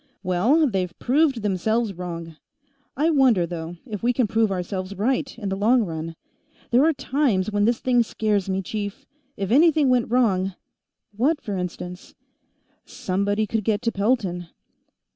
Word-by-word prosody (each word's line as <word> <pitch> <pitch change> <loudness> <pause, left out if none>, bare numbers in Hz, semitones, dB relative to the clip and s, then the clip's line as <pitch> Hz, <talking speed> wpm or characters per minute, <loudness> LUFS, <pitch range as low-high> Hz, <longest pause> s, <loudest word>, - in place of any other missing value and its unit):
"Well... 215 - +3
they've 185 -6 -2
proved 270 -3 +1
themselves 210 +3 0
wrong. 170 -2 -7 0.6
I 315 +4 +3
wonder, 255 - +4
though, 170 0 -6
if 215 -6 -6
we 245 +1 +2
can 245 0 +2
prove 220 0 +1
ourselves 185 +1 -4
right, 255 +7 -1
in 205 -4 -4
the 195 - -1
long 230 +5 +3
run. 165 -2 -5 0.6
There 245 +3 +5
are 325 - +3
times 250 -9 0
when 205 0 +2
this 235 +1 +2
thing 245 -2 +2
scares 210 -3 -1
me, 190 0 -1
chief. 205 +2 -5 0.3
If 195 0 -3
anything 305 0 +5
went 250 -2 +2
wrong 195 -6 +1 0.3
" - - -60
"What, 295 +4 +3
for 205 -7 -5
instance?" 180 0 -6 0.7
"Somebody 200 +3 -1
could 215 +1 -2
get 215 +2 0
to 230 - +1
Pelton." 200 -5 -1
210 Hz, 160 wpm, -23 LUFS, 185-245 Hz, 0.7 s, There